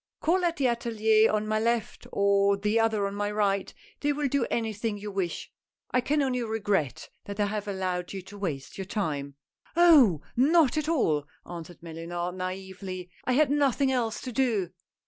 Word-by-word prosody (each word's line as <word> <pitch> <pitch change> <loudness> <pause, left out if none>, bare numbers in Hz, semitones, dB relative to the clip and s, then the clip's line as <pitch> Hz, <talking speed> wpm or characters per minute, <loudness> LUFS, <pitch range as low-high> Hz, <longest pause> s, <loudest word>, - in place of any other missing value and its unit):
Call 360 +3 +2
at 340 -1 +1
the 275 - +1
atSlier 220 -2 +3
on 215 0 0
my 215 0 +1
left, 235 +1 -1
or 200 0 +3
the 210 +3 +1
other 220 -3 +2
on 200 - -3
my 205 0 -1
right, 200 -2 0 0.3
they 290 - +1
will 290 0 0
do 275 -2 0
anything 220 -1 -2
you 205 0 -6
wish 190 -3 -3 0.2
— - - -37
I 255 - +3
can 290 +3 +1
only 255 -2 0
regret 205 - -1 0.2
that 200 +1 -7
I 205 - +3
have 210 0 -3
allowed 185 -2 -2
you 195 -2 -6
to 205 +2 -12
waste 155 -5 -4
your 190 - -3
time." 145 -9 -3 0.2
" - - -32
Oh! 290 - +6
not 290 +2 +4
at 310 0 -1
all," 155 - +1 0.2
answered 170 -1 -9
Mellunard, 170 +2 -4
naively, 185 0 -6
" - - -28
I 255 - +1
had 285 +2 +3
nothing 280 -2 +2
else 235 -3 0
to 255 - -5
do." 225 -8 0
210 Hz, 190 wpm, -28 LUFS, 190-250 Hz, 0.3 s, Oh